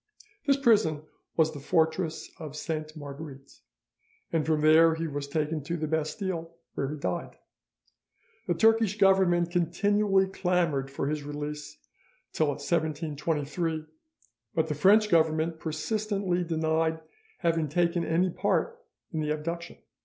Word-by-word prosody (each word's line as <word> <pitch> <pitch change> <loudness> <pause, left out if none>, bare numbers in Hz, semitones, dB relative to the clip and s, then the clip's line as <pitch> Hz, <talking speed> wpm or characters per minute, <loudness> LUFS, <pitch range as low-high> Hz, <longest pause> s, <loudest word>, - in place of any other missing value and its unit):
This 275 -1 +4
prison 205 - +3 0.3
was 160 -1 +3
the 145 - -7
fortress 160 +2 0
of 155 -3 -7
Sainte 155 0 -4
Marguerite, 140 -1 -9 0.7
and 160 -2 +2
from 155 -1 +1
there 160 +1 +6
he 165 +1 -3
was 145 -2 -4
taken 155 +1 -1
to 170 +3 -2
the 155 - -2
Bastille, 165 +2 -3 0.2
where 135 - -2
he 150 - -4
died. 90 -10 -4 1.1
The 175 - +1
Turkish 225 0 +3
Government 190 -3 +4
continually 195 +3 +2
clamoured 175 -7 0
for 135 - -3
his 150 0 -1
release 145 - -6 0.6
till 155 - +2
1723, 155 +1 -1 0.7
but 160 -1 +2
the - - 0
French 205 +8 +5
Government 160 -2 +2
persistently 195 +3 -1
denied 160 -1 0 0.4
having 165 -3 +1
taken 170 +2 +1
any 175 +3 +1
part 470 - -1 0.3
in 160 - -1
the 150 -1 -1
abduction. 170 +3 -4
160 Hz, 130 wpm, -28 LUFS, 150-175 Hz, 1.1 s, there